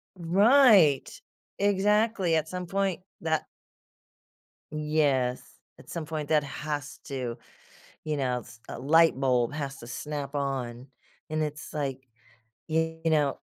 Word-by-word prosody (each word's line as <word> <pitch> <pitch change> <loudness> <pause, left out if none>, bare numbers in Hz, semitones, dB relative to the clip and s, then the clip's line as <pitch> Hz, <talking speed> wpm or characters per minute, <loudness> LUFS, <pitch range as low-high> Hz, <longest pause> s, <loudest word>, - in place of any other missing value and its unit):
Right, 190 - +5 0.5
exactly, 205 -2 +2
at 160 -1 0
some 180 +1 -5
point 195 0 -1 0.2
that 160 -1 0 1.3
Yes, 150 -5 +1 0.4
at - - -16
some 165 -2 -4
point 155 -2 -4
that 155 -2 +3
has 145 -1 -5
to, 125 -4 -4 0.7
you 155 -1 -2
knows 125 -3 -3
a - - -6
light 160 +3 +4
bulb 125 -1 +2
has 140 -2 -4
to 120 - -11
snap 145 +2 -5
on, 130 -3 -3 0.4
and 155 0 -1
it's 150 0 -4
like, 135 -3 -3 0.6
you 160 0 -1
know 150 -3 +2
150 Hz, 120 wpm, -28 LUFS, 135-165 Hz, 1.3 s, Right